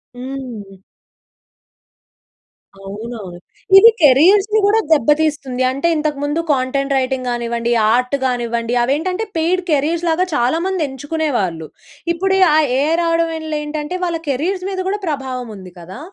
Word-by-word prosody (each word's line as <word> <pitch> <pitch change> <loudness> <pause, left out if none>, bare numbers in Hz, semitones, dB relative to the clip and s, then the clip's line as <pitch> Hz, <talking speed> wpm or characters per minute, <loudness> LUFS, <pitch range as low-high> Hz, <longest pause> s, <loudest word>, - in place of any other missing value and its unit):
హ్మ్. 245 -7 -8 2.1
అవునవును. 220 +3 -7 0.6
ఇది 440 +4 +9
కెరియర్స్‌ని‌‌‌‌‌‌‌‌‌‌‌‌‌‌‌‌‌‌‌‌‌‌ 385 +10 +4
గూడా 420 +2 +3
దెబ్బతీస్తుంది. 295 -3 +1
అంటే, 275 +6 -1
ఇంతకముందు 295 0 -2
కాంటెంట్ 275 +1 -1
‌‌‌‌‌‌‌‌‌‌‌‌‌‌‌‌‌‌‌‌‌‌‌‌‌‌‌‌‌‌‌‌‌‌‌‌‌‌‌‌‌‌‌‌‌‌‌‌‌‌‌‌‌‌రైటింగ్ 255 -1 -2
గానివ్వండి, 235 0 -2 0.2
ఆర్ట్ 250 +3 +1
గానివ్వండి 235 -1 -2
అవేంటంటే, 360 - -1
పెయిడ్ 355 +3 +1
కేరీర్స్‌లాగా 330 +4 +1
చాలా 250 +6 +1
మంది 380 -2 -2
ఎంచుకునేవాళ్ళు. 265 - -3 0.5
ఇప్పుడీ 385 +3 0 0.2
ఆ - - +5 0.2
ఏఐ 300 +3 +1
రావడం 335 0 +1
వల్లేంటంటే 305 +1 -4
వాళ్ళ 335 -2 -2
కెరీర్స్ 360 +8 -2
మీద 375 - -4
గూడా 410 +1 -2
ప్రభావముంది 250 -9 -6
కదా! 185 +9 -10
285 Hz, 110 wpm, -18 LUFS, 245-330 Hz, 2.1 s, ఇది